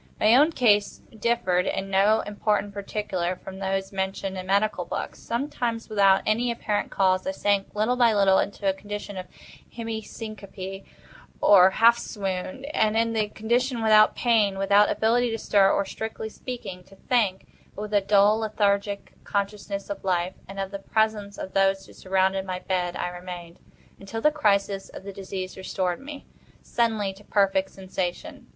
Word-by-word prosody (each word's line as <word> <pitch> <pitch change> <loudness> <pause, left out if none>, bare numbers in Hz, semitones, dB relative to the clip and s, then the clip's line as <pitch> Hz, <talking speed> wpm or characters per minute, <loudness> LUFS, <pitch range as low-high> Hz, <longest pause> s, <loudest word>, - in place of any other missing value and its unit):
My 215 +2 +5
own 295 +5 +5
case 210 -8 +2 0.2
differed 195 -6 +1
in 195 0 -3
no 205 +3 +4
important 205 0 -1
particular 195 -3 -3
from 190 +1 -10
those 195 0 -2
mentioned 190 0 -3
in 185 0 -6
medical 200 -1 +1
books. - - -5
Sometimes, 235 -2 -3
without 195 -2 +4
any 235 +3 +1
apparent 210 -3 -2
cause, 185 -1 +1
I - - +1
sank, 195 +1 0
little 220 +4 +1
by 240 -2 +4
little, 195 -1 +4
into 200 0 -2
a 190 - +3
condition 205 +1 -7
of 185 -1 -6 0.4
semi 225 -1 -4
syncope, 200 -3 -8 0.5
or 190 -2 +7
half 230 +4 +5
swoon; 200 +7 -4
and, 215 0 +2
in 230 0 +1
this 215 -2 0
condition, 240 +2 0
without 215 -1 +6
pain, 215 -5 +2
without 200 +1 +4
ability 240 +2 +2
to 225 - -2
stir, 200 -2 +3
or, 200 - +1
strictly 220 +1 -5
speaking, 215 -7 -7
to 195 - -17
think, 200 -4 0 0.3
but 205 - -5
with 210 0 -7
a 205 - +4
dull 205 +2 +4
lethargic 205 -2 -1
consciousness 200 0 -3
of 200 - -6
life 180 -1 0
and 195 0 -8
of 195 0 -3
the 200 - -5
presence 210 -1 -1
of 190 - -7
those 195 0 +2
who - - -16
surrounded 190 0 0
my 185 -1 -4
bed, 180 -1 -2
I - - -2
remained, 175 -1 -9 0.4
until 200 +3 -6
the 300 +6 +3
crisis 200 -8 +1
of - - -10
the 200 0 -7
disease 190 -1 -6
restored 185 -1 -2
me, 285 0 -9 0.4
suddenly, 220 -4 0
to 200 +2 -17
perfect 195 -2 +1
sensation. 185 -2 -5
200 Hz, 170 wpm, -25 LUFS, 190-220 Hz, 0.5 s, or